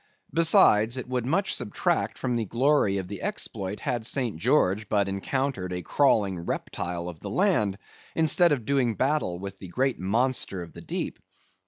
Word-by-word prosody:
Besides, 125 -8 +5
it 130 - -5
would 125 -1 -2
much 195 +8 +1
subtract 115 -5 -1
from 125 -2 -1
the 115 -2 -1
glory 120 -2 +2
of 95 -2 -4
the 100 0 -7
exploit 95 +1 -4
had 125 -5 -2
St. 125 - -1
George 105 - +2
but 100 -2 +2
encountered 100 0 -2
a 90 0 -4
crawling 105 -10 +2
reptile 85 0 -4
of 85 -3 -8
the - - -6
land, 170 - +1 0.4
instead 165 +2 +4
of 130 -7 0
doing 130 -4 +1
battle 135 -9 0
with 100 +1 -8
the 95 - -8
great 130 +8 0
monster 100 -1 0
of 85 -2 -12
the - - -10
deep. - - -4
115 Hz, 170 wpm, -26 LUFS, 95-135 Hz, 0.4 s, Besides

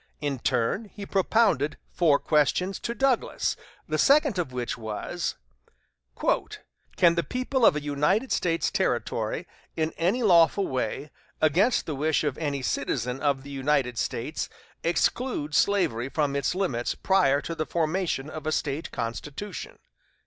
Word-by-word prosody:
In 145 -3 -2
turn 125 - 0
he 205 -1 -9
propounded 190 - +2
four 155 -5 +4
questions 160 +7 +1
to 235 - -4
Douglas, 270 -2 +1 0.3
the - - -1
second 280 -7 +4
of 165 -7 -2
which 125 -1 -3
was: 110 -2 -4 1.6
"Can 170 -1 +5
the 170 - +1
people 255 +3 -2
of 190 - +7
a 150 - -3
United 150 - +1
States 165 -2 +1
Territory - - -1 0.3
in 160 0 0
any 195 +9 +1
lawful 180 0 +5
way, 130 +3 -3 0.3
against 180 - +3
the 155 - -3
wish 155 +3 +1
of 145 -3 -1
any 140 -4 -2
citizen 125 +2 -2
of 140 -2 +1
the 140 - -10
United 135 -3 0
States, 135 +7 -3 0.3
exclude 170 - 0
slavery 145 - +2
from 145 -1 0
its 140 +5 0
limits 150 -12 -1
prior 180 -8 +3
to 165 - -5
the 155 -1 -3
formation 165 -3 -1
of 155 0 -7
a - - +1
State 150 0 -2
constitution?" 150 - -5
155 Hz, 140 wpm, -26 LUFS, 140-190 Hz, 1.6 s, of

